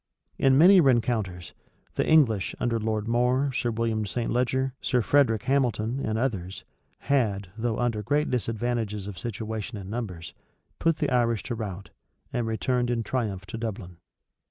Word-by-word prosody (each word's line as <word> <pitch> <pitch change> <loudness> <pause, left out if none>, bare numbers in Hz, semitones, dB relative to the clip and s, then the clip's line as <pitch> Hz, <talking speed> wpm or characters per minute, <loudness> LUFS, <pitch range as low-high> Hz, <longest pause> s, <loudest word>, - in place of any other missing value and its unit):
In 135 -1 +4
many 180 +4 +8
rencounters, 110 - 0 0.4
the - - 0
English, 120 -11 +3
under 115 -1 0
Lord 110 -1 -2
More, 125 +4 +2
Sir 125 -2 -1
William 110 -2 -1
St. 120 +3 -2
Leger, 130 +2 0
Sir 125 -3 +1
Frederic 115 -7 +3
Hamilton, 125 -3 0
and 110 0 -1
others, 100 -7 -2 0.4
had, 105 -9 0
though 115 0 -1
under 120 -3 0
great 145 +8 0
disadvantages 115 -3 -2
of 100 -3 -7
situation 110 0 -4
and 95 0 -8
numbers, 90 -8 -5 0.5
put 165 -1 +2
the 150 -3 -1
Irish 115 -3 +2
to 125 - -4
rout, 100 -4 -6 0.4
and 120 -2 -1
returned 120 +2 0
in 120 -2 0
triumph 105 -7 -2
to 115 - -7
Dublin. 100 -6 -5
115 Hz, 155 wpm, -26 LUFS, 105-125 Hz, 0.5 s, many